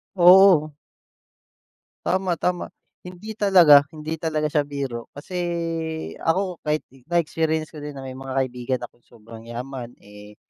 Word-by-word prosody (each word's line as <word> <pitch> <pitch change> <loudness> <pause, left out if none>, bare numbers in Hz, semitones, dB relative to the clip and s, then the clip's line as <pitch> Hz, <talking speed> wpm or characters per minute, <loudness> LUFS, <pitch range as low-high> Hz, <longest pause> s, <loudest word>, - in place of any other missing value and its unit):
Oo. 180 -4 +7 1.3
Tama, 185 -1 +1
tama. 180 -1 -2 0.3
Hindi 185 +4 -9
talaga, 175 -9 +7
hindi 155 +1 -5
talaga 155 -2 -1
siya 150 0 +1
biro 135 -5 -5
kasi 160 +6 -8 0.8
ako, 180 +1 -1
kahit 150 0 -1
i 135 - -19
na-experience 160 -2 0
ko 155 - -9
din 145 -1 -7
na 135 - -8
may 130 - -6
mga 135 0 -6
kaibigan 130 -1 -1
akong 120 - -14
sobrang 115 0 -14
yaman, 125 0 -7
eh, 105 0 -14
150 Hz, 135 wpm, -23 LUFS, 130-175 Hz, 1.3 s, Oo